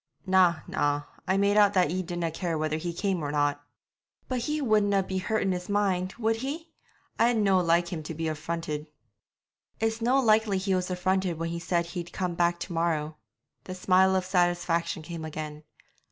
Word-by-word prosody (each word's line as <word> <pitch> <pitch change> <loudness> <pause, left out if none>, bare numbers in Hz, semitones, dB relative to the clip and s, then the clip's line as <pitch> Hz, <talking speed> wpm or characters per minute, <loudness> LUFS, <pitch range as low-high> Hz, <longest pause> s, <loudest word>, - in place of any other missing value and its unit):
'Na, 185 -4 +4
na, 145 0 0 0.2
I 190 +1 +2
made 200 +1 +3
out 205 -1 +5
that 180 -5 +3
ye 185 +1 -1
didna 175 -2 -3
care 165 0 -2
whether 155 0 -1
he 170 +2 -3
came 185 0 -1
or 145 - -2
not.' 145 -1 0 0.6
'But 255 -1 -1
he 300 +6 -1
wouldna 210 -6 +2
be 190 0 -3
hurt 220 +3 0
in 195 - +1
his 180 +1 -4
mind, 190 -3 0
would 225 -1 +1
he? 305 +7 -5 0.5
I'd 235 0 +4
no 195 -3 +3
like 170 0 +2
him 160 - -3
to 155 +1 -7
be 165 +1 -2
affronted.' 155 0 -4 0.9
'It's 225 +1 -1
no 250 +4 +3
likely 220 -4 +3
he 190 +1 0
was 185 0 0
affronted 185 -1 0
when 165 +1 -3
he 170 0 -3
said 170 0 0
he'd 175 0 -6
come 180 -2 -2
back 170 0 +1
to 175 - -5
morrow.' 160 -2 -1 0.5
The 185 - -6
smile 190 +1 +4
of 185 -1 0
satisfaction 175 -3 0
came 165 0 -6
again. 155 -1 -6
180 Hz, 190 wpm, -27 LUFS, 165-200 Hz, 0.9 s, out